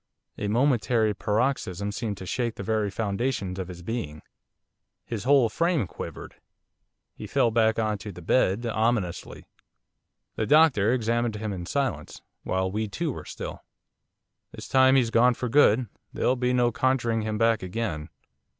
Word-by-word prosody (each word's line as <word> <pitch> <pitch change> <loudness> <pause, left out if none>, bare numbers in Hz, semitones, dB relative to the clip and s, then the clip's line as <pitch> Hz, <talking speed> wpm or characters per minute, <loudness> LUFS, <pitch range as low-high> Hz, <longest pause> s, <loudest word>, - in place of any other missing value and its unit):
A 105 - -2
momentary 115 -2 +2
paroxysm 105 -3 -1
seemed 105 -1 -4
to 95 - -8
shake 120 +4 -2
the - - -6
very 110 0 0
foundations 100 -1 -2
of 95 - -4
his 90 -1 -10
being. 85 -8 -5 0.8
His 115 -1 -5
whole 135 -3 +5
frame 165 - 0
quivered. - - -9 0.8
He - - -9
fell 115 - +2
back 110 -1 +2
on 110 -2 0
to 105 +2 -7
the 90 -2 -11
bed, 110 +3 +2
ominously. 110 -5 -1 0.9
The 110 - -1
doctor 135 -8 +5
examined 120 -2 0
him 105 -1 -4
in 90 -2 -6
silence 140 -2 -3 0.2
while 95 0 -1
we 110 +2 -2
too 160 +9 -3
were - - -8
still. - - -7 0.9
'This - - -9
time 130 0 +5
he's 120 -4 +2
gone 120 +2 +4
for 125 - -3
good, 125 -2 +4 0.2
there'll 125 - +1
be 125 0 0
no 120 -1 +2
conjuring 120 -2 +1
him 110 0 -2
back 115 0 +2
again. 90 -5 -4
115 Hz, 155 wpm, -26 LUFS, 100-125 Hz, 0.9 s, whole